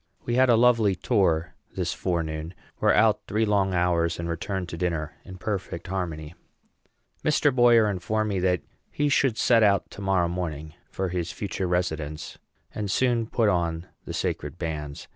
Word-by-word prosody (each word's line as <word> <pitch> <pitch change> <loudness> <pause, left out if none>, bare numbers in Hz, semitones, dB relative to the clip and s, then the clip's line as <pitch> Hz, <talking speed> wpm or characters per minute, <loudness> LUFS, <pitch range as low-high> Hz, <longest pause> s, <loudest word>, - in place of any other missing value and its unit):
We 120 - -1
had 130 +1 +4
a 120 - +6
lovely 115 -4 +4
tour 90 -5 +1 0.2
this - - -1
forenoon, 80 -1 -3 0.2
were - - +4
out - - +3
three 110 +2 +1
long 100 -3 +1
hours, 85 -1 +1
and 85 - -4
returned 90 +2 -3
to 85 - -6
dinner 85 -4 -2
in 95 - -10
perfect 95 -3 -4
harmony. 85 -5 -4 0.9
Mr. 150 -2 +3
Boyer 120 -3 +6
informed 105 +2 -1
me 100 -2 -1
that 90 -4 +1 0.3
he 145 0 0
should 135 -4 +2
set 115 0 +4
out 100 -2 +3
to 100 - -9
morrow 95 -3 +2
morning 80 -3 -4 0.2
for 95 -1 -3
his 90 -1 -3
future 95 -3 -3
residence, 80 -4 -2 0.3
and 105 -2 -3
soon 120 +1 +1
put 115 -1 +1
on 85 -3 0 0.2
the - - -6
sacred - - -3
bands. 75 -4 -5
90 Hz, 165 wpm, -26 LUFS, 85-110 Hz, 0.9 s, a